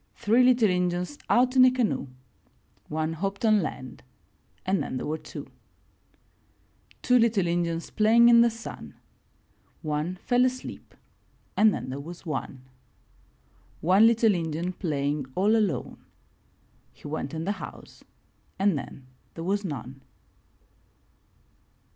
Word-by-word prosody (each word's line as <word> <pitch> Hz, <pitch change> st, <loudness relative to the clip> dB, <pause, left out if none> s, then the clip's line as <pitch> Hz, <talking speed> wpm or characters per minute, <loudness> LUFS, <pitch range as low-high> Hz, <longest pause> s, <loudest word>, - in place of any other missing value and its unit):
Three 225 Hz, +4 st, +3 dB
little 250 Hz, -3 st, +4 dB
Injuns 180 Hz, +6 st, -1 dB
out 250 Hz, +2 st, +3 dB
in 255 Hz, -, +7 dB
a 255 Hz, -, +8 dB
canoe 250 Hz, -, -1 dB, 0.4 s
— -, -, -39 dB, 0.3 s
One 155 Hz, +1 st, -2 dB
hopped 195 Hz, +6 st, -3 dB
on 215 Hz, -2 st, +4 dB
land 130 Hz, -7 st, -6 dB, 0.6 s
and 190 Hz, 0 st, +1 dB
then 130 Hz, -, -4 dB
there -, -, -4 dB
were 155 Hz, +1 st, -3 dB
two. -, -, -9 dB, 1.6 s
Two 250 Hz, 0 st, +4 dB
little 225 Hz, -5 st, +2 dB
Injuns 170 Hz, -1 st, -2 dB
playing 230 Hz, +2 st, +5 dB
in 235 Hz, -1 st, +7 dB
the 235 Hz, -, +5 dB
sun 230 Hz, 0 st, -9 dB, 0.4 s
— -, -, -39 dB
One 155 Hz, +5 st, -2 dB
fell 245 Hz, +6 st, +1 dB
asleep 255 Hz, 0 st, -4 dB, 0.6 s
and 215 Hz, 0 st, +5 dB
then 130 Hz, -, -5 dB
there 135 Hz, -, -5 dB
was 170 Hz, +5 st, -10 dB
one. 135 Hz, -4 st, -5 dB, 1.2 s
One 190 Hz, +7 st, +5 dB
little 230 Hz, -2 st, +4 dB
Injun 170 Hz, +1 st, -3 dB
playing 145 Hz, -5 st, -2 dB
all 205 Hz, +4 st, +3 dB
alone 210 Hz, -6 st, -1 dB, 0.4 s
— -, -, -37 dB
He -, -, -12 dB
went 150 Hz, 0 st, -4 dB
in 160 Hz, +1 st, -4 dB
the 200 Hz, -, 0 dB
house -, -, -11 dB, 0.5 s
and 195 Hz, -2 st, +2 dB
then 135 Hz, -1 st, -10 dB, 0.3 s
there 165 Hz, -, -6 dB
was 200 Hz, +3 st, -1 dB
none. 135 Hz, -, -6 dB
185 Hz, 135 wpm, -26 LUFS, 155-225 Hz, 1.6 s, a